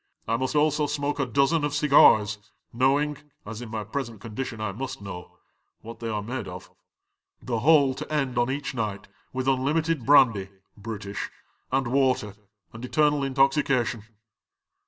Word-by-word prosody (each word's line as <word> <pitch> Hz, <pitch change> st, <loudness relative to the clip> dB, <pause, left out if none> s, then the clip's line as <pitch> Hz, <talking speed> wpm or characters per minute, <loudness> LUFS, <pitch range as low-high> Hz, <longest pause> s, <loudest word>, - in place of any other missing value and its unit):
I 115 Hz, -, +1 dB
must 130 Hz, +4 st, -2 dB
also 150 Hz, 0 st, +2 dB
smoke 145 Hz, 0 st, -2 dB
a 140 Hz, -, 0 dB
dozen 140 Hz, +6 st, +2 dB
of 145 Hz, 0 st, -1 dB
cigars, 110 Hz, -8 st, +5 dB, 0.3 s
knowing 140 Hz, +4 st, +1 dB
— -, -, -46 dB
as 110 Hz, +2 st, -7 dB
in 120 Hz, -, -7 dB
my 110 Hz, -1 st, -4 dB
present 115 Hz, 0 st, -5 dB
condi 115 Hz, +4 st, -5 dB
tion 110 Hz, -, -8 dB
I 110 Hz, -2 st, -2 dB
must 130 Hz, +6 st, -6 dB
know, 90 Hz, -3 st, -9 dB, 0.2 s
— -, -, -49 dB
what 115 Hz, +1 st, -9 dB
they 115 Hz, -, -4 dB
are 105 Hz, -2 st, -2 dB
made 120 Hz, -1 st, -5 dB
of 90 Hz, +1 st, -9 dB, 0.7 s
The 120 Hz, -3 st, -3 dB
whole 140 Hz, 0 st, +5 dB
to 130 Hz, -, -8 dB
end 135 Hz, -4 st, -1 dB
on 120 Hz, +1 st, +1 dB
each 140 Hz, +1 st, -3 dB
night 105 Hz, -5 st, -4 dB, 0.2 s
with 130 Hz, 0 st, -3 dB
unlimited 145 Hz, +3 st, +1 dB
brandy 115 Hz, -8 st, +4 dB, 0.3 s
(British) 100 Hz, -1 st, -6 dB, 0.4 s
and 135 Hz, 0 st, +1 dB
water, 130 Hz, -5 st, +1 dB, 0.4 s
and 115 Hz, +2 st, -9 dB
eternal 150 Hz, +2 st, +2 dB
intoxi 135 Hz, +1 st, +2 dB
cation. 120 Hz, -5 st, 0 dB
130 Hz, 170 wpm, -26 LUFS, 110-140 Hz, 0.7 s, cigars